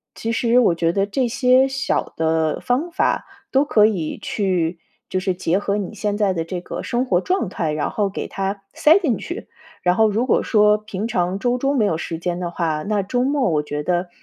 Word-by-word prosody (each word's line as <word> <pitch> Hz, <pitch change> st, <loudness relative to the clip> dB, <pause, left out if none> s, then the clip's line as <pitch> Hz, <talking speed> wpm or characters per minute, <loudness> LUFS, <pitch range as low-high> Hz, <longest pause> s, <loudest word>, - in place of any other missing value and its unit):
其 230 Hz, -, -3 dB
实 235 Hz, +1 st, +3 dB
我 215 Hz, -9 st, +3 dB
觉 165 Hz, 0 st, +1 dB
得 195 Hz, +2 st, +1 dB
这 245 Hz, +5 st, 0 dB
些 255 Hz, +2 st, +4 dB
小 275 Hz, +1 st, -2 dB
的 160 Hz, -1 st, +1 dB
方 280 Hz, +8 st, -1 dB
法 -, -, 0 dB, 0.2 s
都 270 Hz, +1 st, +3 dB
可 215 Hz, -8 st, +4 dB
以 180 Hz, -8 st, -1 dB
去， 180 Hz, -5 st, -1 dB, 0.3 s
就 185 Hz, -, -1 dB
是 185 Hz, 0 st, 0 dB
结 180 Hz, 0 st, 0 dB
合 200 Hz, 0 st, -1 dB
你 200 Hz, -3 st, -4 dB
现 205 Hz, -1 st, -2 dB
在 205 Hz, -3 st, +2 dB
的 165 Hz, -2 st, -2 dB
这 180 Hz, +2 st, -5 dB
个 175 Hz, -, -6 dB
生 245 Hz, +2 st, -1 dB
活 180 Hz, -7 st, +2 dB
状 370 Hz, -, 0 dB
态， 165 Hz, -4 st, -2 dB
然 150 Hz, 0 st, -1 dB
后 205 Hz, -2 st, 0 dB
给 195 Hz, -, -5 dB
它 195 Hz, +1 st, -3 dB
塞 320 Hz, +6 st, +5 dB
进 260 Hz, -, 0 dB
去。 345 Hz, -, -7 dB, 0.4 s
然 180 Hz, 0 st, +3 dB
后 220 Hz, +1 st, +4 dB
如 225 Hz, +4 st, 0 dB
果 -, -, +2 dB
说 210 Hz, -1 st, +4 dB
平 215 Hz, 0 st, -5 dB
常 180 Hz, -2 st, -1 dB
周 245 Hz, +3 st, +1 dB
中 275 Hz, +2 st, 0 dB
没 215 Hz, -, +3 dB
有 165 Hz, -5 st, 0 dB
时 165 Hz, -1 st, -4 dB
间 175 Hz, +1 st, -3 dB
的 175 Hz, -1 st, -3 dB
话， 160 Hz, -3 st, -1 dB
那 210 Hz, -1 st, 0 dB
周 245 Hz, +6 st, 0 dB
末 270 Hz, -5 st, +1 dB
我 150 Hz, -2 st, +1 dB
觉 150 Hz, 0 st, -4 dB
得 175 Hz, +1 st, -1 dB
200 Hz, 240 characters per minute, -21 LUFS, 175-245 Hz, 0.4 s, 塞